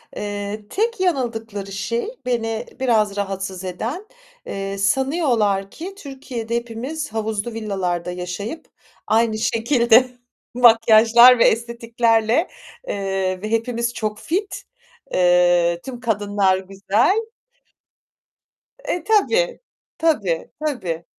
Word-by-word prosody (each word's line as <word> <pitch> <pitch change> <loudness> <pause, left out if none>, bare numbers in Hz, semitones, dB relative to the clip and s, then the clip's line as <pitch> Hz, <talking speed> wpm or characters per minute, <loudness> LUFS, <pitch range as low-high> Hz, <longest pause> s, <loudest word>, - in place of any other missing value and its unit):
Eee, 205 +1 -5
tek 455 +1 -1
yanıldıkları 225 - -2
şey, 230 - -2 0.2
beni 225 -2 -2
biraz 215 -6 +1
rahatsız 195 -2 -4
eden, 230 - -4 0.4
eee, 195 0 -5
sanıyorlar 220 - +1
ki 375 +4 -8
Türkiye'de 260 - -6
hepimiz 240 +6 -4
havuzlu 220 0 -3
villalarda 185 -5 -3
yaşayıp 180 - -6 0.4
aynı 220 0 +2
şekilde 235 +2 +3 0.5
makyajlar 235 +1 +7
ve - - +6
estetiklerle, 230 +3 +1 0.4
eee, 195 -2 -2
ve 215 +1 -5
hepimiz 235 +1 -1
çok 215 -2 -3
fit, 385 +6 -3 0.5
eee, 175 -1 +3
tüm 255 -2 -7
kadınlar 205 -4 +1
güzel. 195 - 0 1.6
E, 350 - -3
tabii, 455 +5 +2 0.4
tabii, 205 - 0 0.2
tabii. 180 - -3
225 Hz, 95 wpm, -21 LUFS, 195-250 Hz, 1.6 s, makyajlar